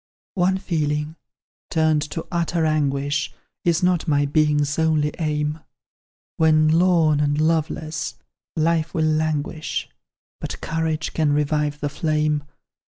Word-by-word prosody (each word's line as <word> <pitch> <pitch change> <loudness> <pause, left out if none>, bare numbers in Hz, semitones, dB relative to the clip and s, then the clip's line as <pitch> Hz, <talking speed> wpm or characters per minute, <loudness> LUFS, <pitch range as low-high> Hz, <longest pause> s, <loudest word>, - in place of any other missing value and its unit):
"One 190 0 +2
feeling 155 -4 -2 0.5
turned 155 -2 +2
to 165 - -5
utter 170 -1 0
anguish, 145 -2 0 0.3
Is 170 0 +2
not 180 -1 +2
my 145 -2 +3
being's 150 0 +1
only 155 -2 +2
aim; 150 -1 -1 0.8
When, 155 -1 +4
lorn 165 -2 +4
and 145 0 +1
loveless, 155 -1 -1 0.4
life 165 0 +1
will 160 -1 +2
languish, 155 0 -1 0.5
But - - -5
courage 160 -1 -2
can 155 -2 +2
revive 150 0 0
the 145 - -1
flame. 150 -1 0
155 Hz, 115 wpm, -22 LUFS, 150-160 Hz, 0.8 s, When